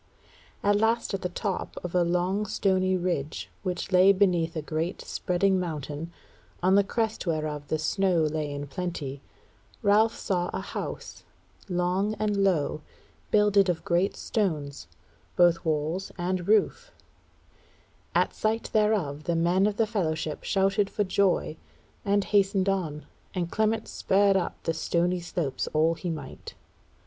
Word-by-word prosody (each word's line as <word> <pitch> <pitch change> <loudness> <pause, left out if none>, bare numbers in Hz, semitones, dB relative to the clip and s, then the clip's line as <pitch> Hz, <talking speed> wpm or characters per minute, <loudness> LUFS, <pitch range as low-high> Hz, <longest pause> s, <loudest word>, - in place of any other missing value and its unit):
At 205 0 +4
last 225 +1 +1
at 195 - -2
the 180 - -2
top 190 +1 -4
of 180 - -5
a 180 - +3
long 180 +4 0
stony 185 -2 +1
ridge, 175 -5 -3
which 185 0 -3
lay 185 +1 +7
beneath 180 -4 +2
a 160 - -2
great 160 +4 -3
spreading 190 +1 +1
mountain, 155 -1 -4 0.5
on 185 +1 +4
the 200 +1 +6
crest 220 -1 -2
whereof 155 -3 -2
the 155 - 0
snow 175 +1 +1
lay 155 -1 -1
in 145 0 -4
plenty, 145 -3 -5 0.6
Ralph 215 +2 +4
saw 175 -2 -1
a - - -2
house, - - -6 0.5
long 180 +4 0
and 210 -1 0
low, 155 -5 +1 0.5
builded 205 -2 +4
of 170 -2 -2
great 175 +3 +1
stones, 150 - -2 0.5
both 175 -1 +4
walls 160 +4 -1
and 180 0 -2
roof: 220 - +2 1.3
at - - +2
sight 220 +1 -1
thereof 200 -10 +1
the 170 - 0
men 175 +4 +3
of 205 -1 -2
the 225 - +3
fellowship 160 -8 -2
shouted 195 0 +1
for 210 - 0
joy, 185 -4 +1 0.5
and 200 0 +2
hastened 195 -1 +2
on, 160 -7 -1 0.3
and 175 -2 -2
Clement 220 +1 0
spurred 200 0 +2
up 190 - -2
the 165 - 0
stony 175 +2 0
slopes 170 -6 -3
all 160 +2 +3
he 170 +2 -5
might. 150 -5 -7
180 Hz, 145 wpm, -27 LUFS, 160-200 Hz, 1.3 s, lay